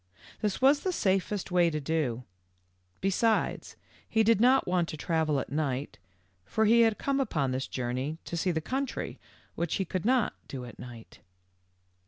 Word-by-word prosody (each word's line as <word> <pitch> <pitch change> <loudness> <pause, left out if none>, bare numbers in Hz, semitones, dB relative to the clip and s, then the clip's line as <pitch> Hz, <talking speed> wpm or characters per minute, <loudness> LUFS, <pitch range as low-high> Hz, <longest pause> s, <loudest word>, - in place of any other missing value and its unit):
This 210 -3 -1
was 275 +2 +5
the 375 - -1
safest 195 - 0
way 175 -1 +4
to 155 -1 -2
do; 140 -5 -1 0.8
besides, 215 +3 0 0.3
he 220 -1 +3
did 220 -1 +4
not 260 +2 +5
want 180 -2 +1
to 155 - -5
travel 155 -2 0
at - - -6
night, 140 -2 -2 0.4
for 220 - 0
he 230 +2 +6
had 225 -2 +3
come 275 0 0
upon 150 - 0
this 130 +1 -2
journey 130 +5 -3
to - - -5
see 170 +2 0
the 160 -2 0
country, 265 - -3 0.3
which 170 - -2
he 195 - -1
could 180 0 -3
not 250 0 +2
do 130 -2 -6
at 120 - -12
night. 120 -2 -11
175 Hz, 170 wpm, -29 LUFS, 145-225 Hz, 0.8 s, he